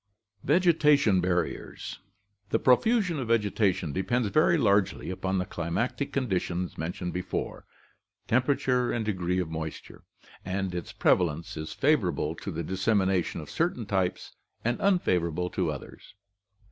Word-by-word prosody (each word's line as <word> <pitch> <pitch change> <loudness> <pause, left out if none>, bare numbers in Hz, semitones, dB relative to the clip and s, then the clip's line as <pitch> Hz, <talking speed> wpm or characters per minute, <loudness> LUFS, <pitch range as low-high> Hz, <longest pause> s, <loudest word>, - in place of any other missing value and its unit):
Vegetative 150 - +4
Barriers. 90 -1 -2 0.3
— 100 0 -44
The - - +2
profusion 180 - +3
of 125 - -3
vegetation 105 -8 +1
depends 110 +4 0
very 160 +7 +4
largely 100 - +2
upon 95 +1 -2
the 90 - 0
climatic 90 - -2
conditions 90 -8 -1
mentioned 90 +2 -4
above 90 0 -3 0.4
— - - -50
temperature 125 0 +2
and 115 -2 -1
degree 90 -4 -1
of 90 -3 -2
moisture 80 -1 -6 0.3
— - - -22
and 95 -2 -2
its 90 -1 -5
prevalence 85 -2 +1
is 80 0 -5
fa 150 +3 +4
vorable 85 - -2
to - - -5
the 85 -2 -3
dissemination 95 -1 +1
of 75 - -10
certain 160 -9 -1
types 95 -3 -2 0.3
and 120 +1 0
unfavor 135 - +2
able 90 +3 -3
to 90 -4 0
others. 75 +5 -10
95 Hz, 145 wpm, -28 LUFS, 90-125 Hz, 0.4 s, Vegetative